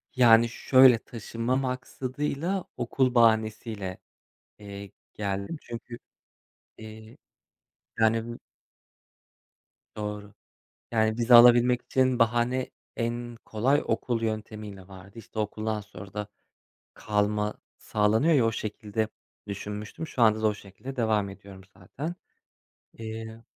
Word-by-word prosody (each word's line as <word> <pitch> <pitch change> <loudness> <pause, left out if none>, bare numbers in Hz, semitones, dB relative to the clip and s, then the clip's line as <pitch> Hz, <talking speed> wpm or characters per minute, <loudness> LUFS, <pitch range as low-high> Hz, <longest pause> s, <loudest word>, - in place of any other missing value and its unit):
Yani 115 -2 +6
şöyle 130 0 +6
taşınma 115 +2 -3
maksadıyla 135 +7 -2
okul 125 +1 0
bahanesiyle, 110 -4 +2 0.6
eee, 100 -1 -9 0.2
geldim. 100 +8 -3
Çünkü, 120 0 -8 0.8
eee, 110 0 -11 0.8
yani 115 +1 +1 1.6
Doğru. 105 -1 -5 0.6
Yani 110 0 +1
vize 120 +1 +4
alabilmek 120 +1 +7
için 130 -1 +1
bahane 120 +2 +1 0.3
en 120 0 -3
kolay 130 +7 +1
okul 120 -3 -1
yöntemiyle 110 -3 -5
vardı. 95 +3 -13
İşte 110 0 -10
okuldan 110 0 -2
sonra 100 -1 -12
da 105 -1 -4 0.7
kalma 105 0 0 0.2
sağlanıyor 110 +9 +2
ya 130 -6 +4
o 115 - +2
şekilde 105 0 -3 0.4
düşünmüştüm. 105 - -6
Şu 125 - -3
anda 110 -1 +5
da 110 - +3
o 105 - +1
şekilde 105 +7 -10
devam 110 -4 +1
ediyorum 95 0 -12 0.2
zaten. 140 - -6 0.8
Eee 110 0 -8
110 Hz, 105 wpm, -27 LUFS, 105-120 Hz, 1.6 s, alabilmek